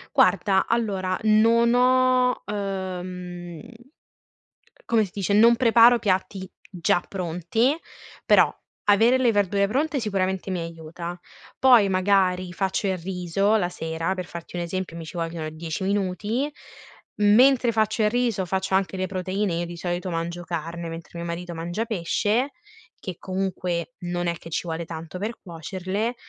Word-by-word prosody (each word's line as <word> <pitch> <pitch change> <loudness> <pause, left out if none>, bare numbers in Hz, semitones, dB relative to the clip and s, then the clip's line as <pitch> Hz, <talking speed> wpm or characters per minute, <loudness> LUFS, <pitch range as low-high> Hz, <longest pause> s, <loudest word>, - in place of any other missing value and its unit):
Guarda, 195 -2 +4
allora, 195 -5 0
non 230 +2 +4
ho, 255 0 +3
uhm 180 -3 -5 1.3
come 220 -2 +4
si 180 - -13
dice, 200 -1 -1
non 230 +3 +6
preparo 235 0 +6
piatti 190 -1 -1 0.2
già 175 -1 +1
pronti, 185 - 0 0.5
però - - +5 0.4
avere 225 +5 +5
le 245 -3 +3
verdure 200 -1 +2
pronte 280 +3 0
sicuramente 190 -2 -1
mi 180 - -2
aiuta. 170 +1 -7 0.4
Poi 245 -6 +6
magari 185 -1 +2
faccio 190 +2 -1
il 190 - 0
riso 185 +3 0
la 180 -5 +1
sera, 165 +1 -3
per 185 -1 -4
farti 170 +1 -8
un 175 - -1
esempio, 175 -1 -4
mi 165 - -7
ci 160 +3 -10
vogliono 165 -2 -3
10 160 +3 -5
minuti, 205 +8 -1 0.7
mentre 240 +3 +5
faccio 220 0 +1
il 210 - +4
riso 235 -5 0
faccio 190 +1 -2
anche 190 0 0
le 185 - -1
proteine, 190 +1 -2
io 170 +1 -1
di 170 0 -8
solito 175 +1 -3
mangio 170 +1 -3
carne, 170 0 -5
mentre 165 0 -8
mio 170 - -4
marito 170 +1 -5
mangia 175 +7 -3
pesce, 220 +6 0 0.5
che 185 -4 -6
comunque 180 -3 -3
non 175 -1 -3
è 170 - 0
che 165 - -11
ci - - 0
vuole 165 0 -4
tanto 165 +1 -7
per 220 +3 -4
cuocerle, 190 +6 -4
190 Hz, 150 wpm, -24 LUFS, 175-215 Hz, 1.3 s, non